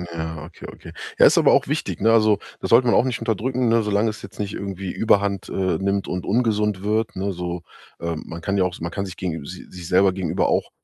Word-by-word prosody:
Ja, 80 -1 -5
okay, - - -11
okay. - - -12 0.3
Ja, - - +8
ist - - +5
aber - - +5
auch - - +3
wichtig, - - -3
ne? 115 +2 +4
Also, 110 -3 +4 0.2
das - - -3
sollte 120 +2 +6
man - - +4
auch - - +5
nicht 125 -3 -2
unterdrücken, 125 +3 -1
ne, 115 0 +3
solange 105 +1 +1
es 105 -1 -7
jetzt 100 - -12
nicht 100 -1 -3
irgendwie 95 -2 -5
Überhand, 100 -3 +1
äh, 95 -3 0
nimmt 100 0 -1
und 90 -1 -3
ungesund 105 -3 +1
wird, 110 +2 0
ne, 95 +1 -2
so, 90 -1 -5 0.4
äh, 85 0 -3
man 80 +2 -8
kann 100 +3 -1
ja 95 - +3
auch 90 0 -3
man 85 +1 -4
kann 100 +2 -3
sich 90 - -9
gegen 80 -5 -4
si 90 +5 -9
sich 90 -2 -9
selber 95 +1 +4
gegenüber 90 -4 0
auch - - 0
100 Hz, 245 wpm, -22 LUFS, 90-105 Hz, 0.4 s, Ja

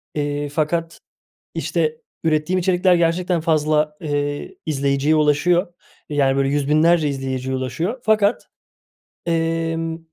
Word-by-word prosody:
eee, 145 0 -2
fakat, 165 +2 -2 0.6
işte, 465 0 -1 0.3
ürettiğim 160 +3 +1
içerikler 180 0 +3
gerçekten 170 0 +1
fazla, 155 -1 +1
eee, 145 -1 -3
izleyiciye 140 0 +1
ulaşıyor, 170 +4 +2 0.4
yani, 140 -2 +2
böyle, 135 0 +2
yüz 145 0 0
binlerce 155 0 +4
izleyiciye 130 -1 -3
ulaşıyor 160 - -3
fakat, 215 0 +2 0.8
emm 165 0 -1
155 Hz, 105 wpm, -21 LUFS, 145-170 Hz, 0.8 s, binlerce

